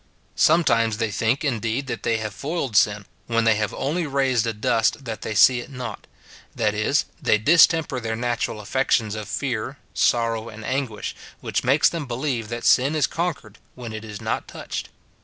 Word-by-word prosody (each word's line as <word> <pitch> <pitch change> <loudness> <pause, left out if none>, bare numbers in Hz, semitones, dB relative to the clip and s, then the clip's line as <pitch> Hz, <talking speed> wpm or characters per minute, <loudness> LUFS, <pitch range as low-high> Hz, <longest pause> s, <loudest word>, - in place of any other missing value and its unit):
Sometimes 115 -10 +3
they 115 -1 -1
think, 115 +8 0
indeed, 120 0 -1
that 130 - -5
they 115 - +1
have 110 -2 -4
foiled 140 - -3
sin, 105 0 +3 0.2
when 115 -1 +1
they 115 -1 +5
have 105 -1 -1
only 160 +4 -2
raised 135 -4 +1
a - - +1
dust 115 +4 0
that 110 -3 -5
they 110 - -4
see 125 +5 +6
it 120 - -8
not; 125 -2 -7 0.5
that - - +1
is, - - +1 0.2
they - - +3
distemper 160 +2 +4
their 115 -1 -3
natural 120 -2 -2
affections 110 -1 +1
of 110 -1 -6
fear, 130 0 -3 0.2
sorrow, 115 -1 +1
and 110 0 -10
anguish, 130 -5 -3 0.2
which - - -2
makes 140 +4 +4
them 165 -5 -3
believe 125 -3 -2
that 120 0 -5
sin 135 +5 +4
is 150 -3 +3
con 170 0 -1
quered - - -17 0.2
when 120 -3 -7
it 110 0 -6
is 105 -2 -8
not - - -3
touched. - - -6
120 Hz, 185 wpm, -23 LUFS, 110-135 Hz, 0.5 s, see